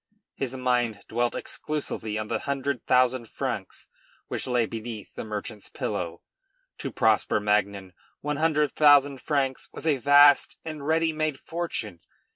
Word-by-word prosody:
His 130 -1 -4
mind 120 -4 0
dwelt 120 +1 0
exclusively 115 -8 -3
on 110 0 -3
the - - -1
hundred 140 -2 -3
thousand 125 -2 +3
francs - - -4 0.4
which - - -3
lay 125 -2 +2
beneath 110 -1 -7
the - - -6
merchant's 105 0 -6
pillow. 85 -2 -4 0.6
To - - -4
Prosper - - +2
Magnan 100 -2 0 0.3
one 150 0 -2
hundred 150 -2 +2
thousand 145 -2 +5
francs 135 -3 -1
was - - -8
a 150 -4 +3
vast 145 +2 +6
and 155 -3 -6
ready 160 0 +2
made 155 -3 -1
fortune. 160 - -4
130 Hz, 140 wpm, -26 LUFS, 110-145 Hz, 0.6 s, vast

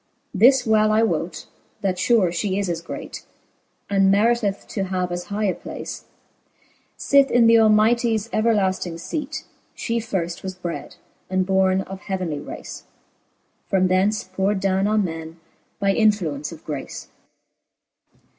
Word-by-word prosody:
This 250 +6 +5
well 215 -1 +3
L 225 +1 +4
wote, - - -3 0.4
that 185 -2 -1
fare 210 -7 +3
fhe 190 +3 -1
is 200 -3 -1
as 165 -1 -2
great, 165 - -8 0.6
And 195 -1 +3
meriteth 205 0 +1
to 195 -3 -2
have 185 -1 -2
as 175 0 -4
high 210 +1 -3
a 195 -3 +2
place, - - -8 0.9
Sith 280 -1 +4
in 235 -1 +4
th' 230 0 +6
Almighties 220 +1 +3
everlafting 190 -6 +1
feat 300 - -4 0.3
She 230 0 -2
firft 185 -6 -3
was 190 -1 -6
bred, 175 -2 -6 0.3
and 185 0 +1
borne 190 0 +2
of 190 0 -8
heavenly 180 -6 -3
race; - - -9 0.8
From 185 -1 +2
thence 195 +3 +2
pour'd 190 +2 -1
downe 195 0 +1
on 215 0 +2
men, 165 -1 -7 0.4
by 200 -1 +2
influence 175 -10 +1
of 165 -2 -12
grace, 145 -3 -6 1.1
II. - - -32
195 Hz, 145 wpm, -22 LUFS, 185-215 Hz, 1.1 s, th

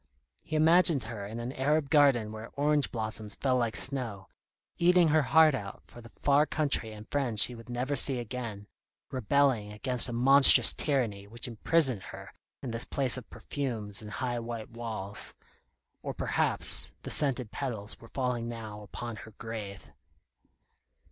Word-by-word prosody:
He 155 - -6
imagined 160 -2 +4
her 110 -3 -7
in 110 +3 -7
an 120 +2 -5
Arab 140 +2 -1
garden 135 -8 +3
where 110 +1 -9
orange 145 0 +1
blossoms 110 -2 -2
fell 130 -2 0
like 115 -3 -1
snow, 120 -8 +2 0.5
eating 175 -1 +4
her 155 +1 +3
heart 155 +2 +4
out 100 -7 -6
for 120 - -14
the 115 - -14
far 145 +5 +1
country 140 -7 -1
and 110 0 -11
friends 125 -7 +4
she 125 - +1
would 115 +1 -13
never 125 +4 -2
see 135 -2 +4
again, 115 -3 -6 0.5
rebelling 130 -3 +1
against 125 +3 -1
a - - -4
monstrous 135 +4 +7
tyranny 115 -9 -2
which 115 +4 -7
imprisoned 125 0 +1
her - - -11 0.3
in 125 - -4
this 115 0 -2
place 135 -3 0
of 125 -4 -9
perfumes 115 -8 -5
and 105 -1 -9
high 120 -3 -3
white 115 -1 -7
walls. 110 -4 -5 0.7
Or - - -6
perhaps - - -2
the - - -5
scented 130 -6 +3
petals 110 -7 -3
were 115 - -14
falling 125 -2 -3
now 110 -3 -8
upon 110 +3 -8
her 110 -1 -12
grave. 110 -4 -8
120 Hz, 160 wpm, -29 LUFS, 110-140 Hz, 0.7 s, monstrous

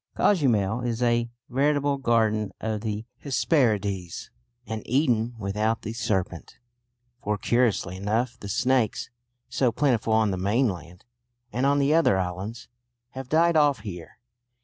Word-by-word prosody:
Cozumel 120 - +2
is 120 0 -2
a 120 0 +1 0.2
veritable 140 +2 +1
Garden 110 -4 +1
of 110 -1 -3
the 110 0 -4
Hesperides 105 - 0 0.3
an 110 -2 -4
Eden 120 -3 +1
without 110 +2 -1
the 110 - -4
serpent, 95 -7 -3 0.6
for 105 0 -1
curiously 110 -5 +1
enough 110 +5 -1
the 100 - -8
snakes, 125 +2 0 0.4
so 125 -3 +1
plentiful 115 -3 +1
on 110 -2 +3
the 95 - -2
mainland 95 -3 -1 0.5
and 130 +3 +1
on 140 0 +3
the 140 +1 +3
other 160 -12 +4
islands, 95 +5 -4 0.4
have 130 -1 -8
died 165 +2 +3
off 145 -6 +3
here. 90 -6 -8
115 Hz, 130 wpm, -25 LUFS, 105-130 Hz, 0.6 s, other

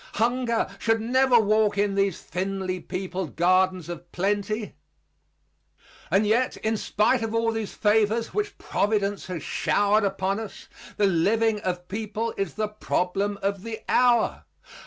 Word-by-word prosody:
Hunger 235 +1 +1
should 225 0 +2
never 250 +2 +4
walk 215 -1 +2
in 205 0 +1
these 195 -2 0
thinly 185 +1 -3
peopled 185 -1 -5
gardens 185 0 +2
of 175 0 -8
plenty. 205 +3 -1 1.4
And 200 +2 +3
yet 235 +5 +1
in 220 +1 -1
spite 215 +3 +1
of 225 0 -2
all 230 0 +2
these 225 -2 -4
favors 220 +1 +2
which 420 0 -2
providence 205 -1 -1
has 180 -5 -5
showered 205 +1 +2
upon 195 0 -1
us, 220 -3 -9 0.3
the 210 - +3
living 210 +5 +2
of 185 -3 -1
the 175 - -22
people 215 +4 -4
is 195 -4 -3
the 215 0 -1
problem 200 -1 -1
of 200 -1 -1
the 225 +1 -6
hour. 245 -2 +3
205 Hz, 145 wpm, -25 LUFS, 190-225 Hz, 1.4 s, never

